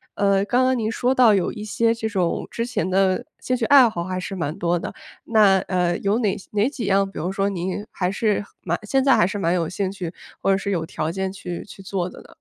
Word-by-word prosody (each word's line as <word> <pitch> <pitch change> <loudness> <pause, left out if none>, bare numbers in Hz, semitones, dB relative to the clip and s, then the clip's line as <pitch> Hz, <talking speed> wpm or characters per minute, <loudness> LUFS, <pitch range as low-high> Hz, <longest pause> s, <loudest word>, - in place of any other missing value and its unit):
呃， 200 -1 +2
刚 250 +5 +2
刚 260 0 +2
您 220 -1 -1
说 250 +3 +1
到 245 -4 +6
有 195 -3 +1
一 210 - -7
些 230 +2 +1
这 225 -1 -3
种 185 -5 -1
之 230 - -2
前 240 -8 -2
的 190 +4 +2
兴 255 - -1
趣 240 - -3
爱 270 -4 +8
好 170 -5 -4
还 185 +1 -3
是 195 +2 -5
蛮 165 -2 -3
多 175 -2 +1
的， - - -5 0.3
那， 210 -4 +4
呃， 180 -2 0
有 200 +3 +1
哪 210 -5 0
些 - - -14
哪 210 +3 +2
几 275 -4 -5
样， 195 0 +2
比 - - -12
如 180 +4 -2
说 195 0 0
您 190 +1 -3
还 180 0 -2
是 210 0 0 0.2
蛮 170 0 0
现 270 +6 +1
在 270 0 +5
还 - - +4
是 195 +3 -3
蛮 170 -3 +1
有 170 -3 0
兴 190 +1 -2
趣， 185 -4 -5 0.3
或 195 - +2
者 195 - +3
是 200 0 -3
有 170 -4 -1
条 155 -1 -3
件 190 +2 -2
去 180 -3 -6
去 195 - -13
做 190 -2 -3
的 - - -12
呢？ - - -17
195 Hz, 275 characters per minute, -22 LUFS, 180-220 Hz, 0.3 s, 爱